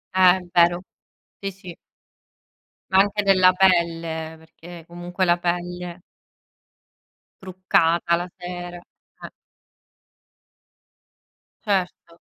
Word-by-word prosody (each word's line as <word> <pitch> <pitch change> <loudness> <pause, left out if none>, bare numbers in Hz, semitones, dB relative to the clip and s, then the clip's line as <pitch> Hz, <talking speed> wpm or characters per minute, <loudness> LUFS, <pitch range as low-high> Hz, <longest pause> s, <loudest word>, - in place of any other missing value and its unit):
Eh, 185 -1 +6
è 185 - -10
vero. 175 +1 +3 0.6
Sì, 195 - -4
sì. 180 -3 -12 1.2
Ma 190 - +5
anche 205 +1 +2
della 185 -2 +5
pelle, 165 -3 +1
perché 165 +1 -14
comunque 175 +2 -3
la 175 0 +3
pelle 175 0 -4 1.4
Truccata 175 -2 +1
la 175 +1 -4
sera, 175 0 -7
eh. 175 - -15 2.4
Certo. 180 -4 -2
175 Hz, 90 wpm, -22 LUFS, 170-185 Hz, 2.4 s, Eh